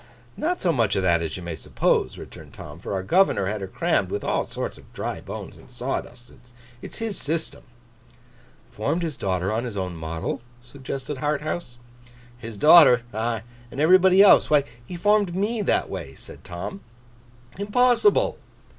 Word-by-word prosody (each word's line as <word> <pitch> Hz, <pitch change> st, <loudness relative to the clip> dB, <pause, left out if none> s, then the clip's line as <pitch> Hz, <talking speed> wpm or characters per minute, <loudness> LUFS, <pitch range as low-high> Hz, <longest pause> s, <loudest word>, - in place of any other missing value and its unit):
'Not 355 Hz, +3 st, -1 dB
so 175 Hz, -, +1 dB
much 120 Hz, -5 st, +1 dB
of 95 Hz, -, 0 dB
that 85 Hz, -2 st, +3 dB
as 80 Hz, 0 st, -4 dB
you 90 Hz, -, -8 dB
may 85 Hz, -1 st, -5 dB
suppose,' 70 Hz, -, 0 dB
returned -, -, -12 dB
Tom; -, -, -10 dB
'for -, -, -6 dB
our 95 Hz, -1 st, -2 dB
governor 180 Hz, -, +3 dB
had 105 Hz, +2 st, -3 dB
her 95 Hz, -, -4 dB
crammed -, -, 0 dB
with -, -, -3 dB
all -, -, -1 dB
sorts -, -, -5 dB
of -, -, -19 dB
dry -, -, -4 dB
bones -, -, -8 dB
and -, -, -17 dB
sawdust. 125 Hz, -1 st, -5 dB, 0.5 s
It's -, -, -9 dB
his 225 Hz, -4 st, -3 dB
system.' 160 Hz, +2 st, -2 dB, 1.1 s
'Formed 160 Hz, +11 st, -2 dB
his 160 Hz, -4 st, -3 dB
daughter 95 Hz, 0 st, -1 dB
on 115 Hz, +2 st, -1 dB
his 115 Hz, -5 st, -5 dB
own 90 Hz, -2 st, -3 dB
model?' 80 Hz, +4 st, -4 dB, 0.2 s
suggested 135 Hz, +2 st, -6 dB
Harthouse. 150 Hz, -2 st, -3 dB, 0.6 s
'His 115 Hz, -3 st, -9 dB
daughter? 150 Hz, -4 st, +7 dB
Ah! 110 Hz, +1 st, -2 dB, 0.3 s
and 135 Hz, -, -8 dB
everybody 185 Hz, +4 st, +6 dB
else. 205 Hz, -, +6 dB
Why, 150 Hz, -2 st, +4 dB, 0.2 s
he 175 Hz, -, -8 dB
formed 205 Hz, 0 st, +2 dB
Me 210 Hz, +4 st, -1 dB
that 200 Hz, -, +1 dB
way!' 80 Hz, -8 st, -7 dB
said -, -, -12 dB
Tom. 90 Hz, -, -7 dB, 0.8 s
'Impossible! 250 Hz, -, +3 dB
130 Hz, 165 wpm, -24 LUFS, -, 1.1 s, daughter